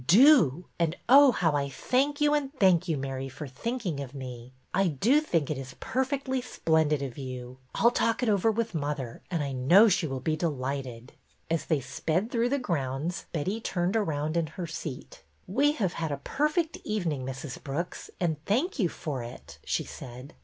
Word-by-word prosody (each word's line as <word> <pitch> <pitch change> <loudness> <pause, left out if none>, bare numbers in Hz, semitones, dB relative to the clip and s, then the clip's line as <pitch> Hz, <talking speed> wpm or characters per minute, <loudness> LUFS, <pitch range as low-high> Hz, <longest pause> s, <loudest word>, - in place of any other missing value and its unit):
Do! 195 - +6
And, 165 0 +1
oh, 275 +2 +8
how 170 -8 +2
I 140 -1 0
thank 270 - 0
you 295 0 +4
and 285 -2 0
thank 185 -4 +4
you, 160 -3 0
Mary, 135 0 -4
for 145 +3 -7
thinking 180 - -3
of 140 0 -6
me. 125 -2 -7 0.2
I 195 0 +3
do 220 - +3
think 165 - 0
it 145 - -2
is 135 -1 -8
perfectly 265 0 -1
splendid 160 - +1
of 135 0 -6
you. 130 -1 -7 0.2
I - - 0
'll 235 - +8
talk 230 0 +1
it - - +1
over 210 0 +3
with 225 0 -1
mother, 145 -6 -3
and 170 -5 -1
I 140 - -3
know 170 - +6
she 180 -3 +1
will 135 -2 -3
be 155 +4 0
delighted." 135 -6 -3 0.4
As 165 -2 0
they 155 -4 +1
sped 170 - -1
through 235 0 +1
the 280 - +1
grounds 160 - -2
Betty 190 +8 -2
turned 180 0 -1
around 155 -7 0
in 165 -2 +1
her 170 +3 -6
seat. 155 -4 -7 0.3
''We 280 +10 +3
have 190 - 0
had 160 -2 -3
a 140 - -1
perfect 305 - 0
evening, 170 -11 -1
Mrs. 135 +1 -6
Brooks, 155 +5 -4
and 160 -4 -1
thank 270 - 0
you 185 -6 +3
for 145 -6 -4
it," 120 +2 -10
she - - -1
said. 125 - -10
165 Hz, 190 wpm, -28 LUFS, 135-225 Hz, 0.4 s, oh